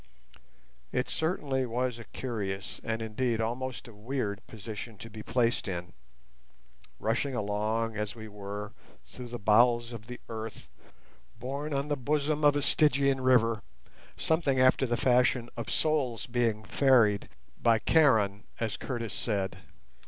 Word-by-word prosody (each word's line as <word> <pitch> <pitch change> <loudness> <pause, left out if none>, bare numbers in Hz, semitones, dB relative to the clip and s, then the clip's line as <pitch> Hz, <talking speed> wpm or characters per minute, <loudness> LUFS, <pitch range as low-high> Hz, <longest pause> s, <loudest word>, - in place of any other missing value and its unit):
It 125 +1 0
certainly 150 -5 0
was 125 0 -1
a 115 - -9
curious, 100 -6 -4
and 115 0 -2
indeed 115 +1 -1
almost 125 +1 -3
a 115 - -12
weird, 105 -1 -3
position 110 0 -7
to 115 +3 -9
be 110 0 -8
placed 115 -1 +1
in—rushing 65 - -6
along, 110 +2 -1
as 105 +1 -2
we 110 -1 -8
were, 105 0 -6 0.3
through 125 -1 -9
the 120 0 -5
bowels 120 +3 +4
of 115 -1 -8
the 125 0 -7
earth, 110 -1 -6 0.7
borne 140 +5 -4
on 140 0 -1
the 145 - +2
bosom 150 +3 0
of 145 -1 +6
a 145 - 0
Stygian 140 -3 +3
river, 115 -4 +4 0.6
something 160 -5 +1
after 130 +1 +4
the 120 0 0
fashion 125 -1 +3
of 115 - -5
souls 140 -7 +1
being 115 -3 0
ferried 115 -5 +4 0.3
by 115 -1 +5
Charon, 110 -6 +3
as 110 -2 -2
Curtis 120 -4 -4
said. 100 -4 -1
115 Hz, 135 wpm, -30 LUFS, 105-130 Hz, 0.7 s, of